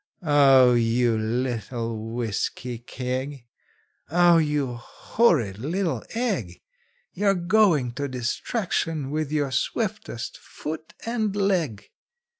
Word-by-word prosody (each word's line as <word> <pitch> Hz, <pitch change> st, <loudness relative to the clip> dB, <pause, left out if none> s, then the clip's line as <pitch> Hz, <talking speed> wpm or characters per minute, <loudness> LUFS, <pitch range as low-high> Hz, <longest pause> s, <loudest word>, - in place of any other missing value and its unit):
Oh, 135 Hz, -5 st, +6 dB
you 120 Hz, 0 st, +2 dB
little 115 Hz, -1 st, -2 dB
whisky 120 Hz, +1 st, -3 dB
keg! 130 Hz, +2 st, -5 dB, 0.6 s
Oh, 175 Hz, 0 st, +5 dB
you 150 Hz, -5 st, 0 dB
horrid 120 Hz, -, 0 dB
little 170 Hz, -, -1 dB
egg! 195 Hz, -, -2 dB, 0.5 s
You're 200 Hz, +1 st, +2 dB
goin' 175 Hz, -, +3 dB
to 140 Hz, +4 st, -3 dB
destruction 140 Hz, -, -2 dB
with 155 Hz, -1 st, -2 dB
your 145 Hz, -3 st, 0 dB
swiftest 130 Hz, -, -3 dB
foot 155 Hz, +1 st, -7 dB
and 220 Hz, -3 st, -1 dB
leg! 180 Hz, -, 0 dB
140 Hz, 95 wpm, -25 LUFS, 120-170 Hz, 0.6 s, Oh